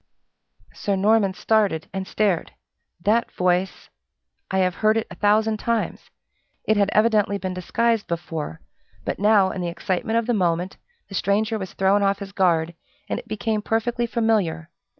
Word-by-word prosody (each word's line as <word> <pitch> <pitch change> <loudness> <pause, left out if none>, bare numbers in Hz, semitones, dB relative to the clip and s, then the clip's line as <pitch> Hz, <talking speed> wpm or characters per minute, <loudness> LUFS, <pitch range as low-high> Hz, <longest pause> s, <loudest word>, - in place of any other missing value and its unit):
Sir 200 - -1
Norman 200 -1 +3
started 205 -9 +1
and 190 -1 -4
stared. 200 -6 0 0.5
That 220 +5 +1
voice! 180 +1 -1 0.6
I 190 - -1
have 185 -1 +2
had - - -16
heard 215 +1 +4
it 225 - -1
a - - -8
thousand 215 +1 +2
times! 230 +1 -2 0.5
It 215 - +2
had 200 -1 +2
evidently 215 -2 +3
been 185 -2 -4
disguised 225 +4 0
before; 165 - -4 0.4
but - - -3
now, 205 -2 +4
in 185 - -4
the 175 - -2
excitement 190 +5 -1
of 230 - +1
the 245 - +1
moment, 180 -2 0 0.3
the - - -12
stranger 215 +3 0
was 190 -2 -6
thrown 195 +2 +2
off 200 0 +2
his 200 -1 -8
guard, 170 -4 +1 0.4
and - - -1
it - - -13
became 215 0 -1
perfectly 235 +2 -1
familiar. 215 -9 0
200 Hz, 165 wpm, -23 LUFS, 185-220 Hz, 0.6 s, heard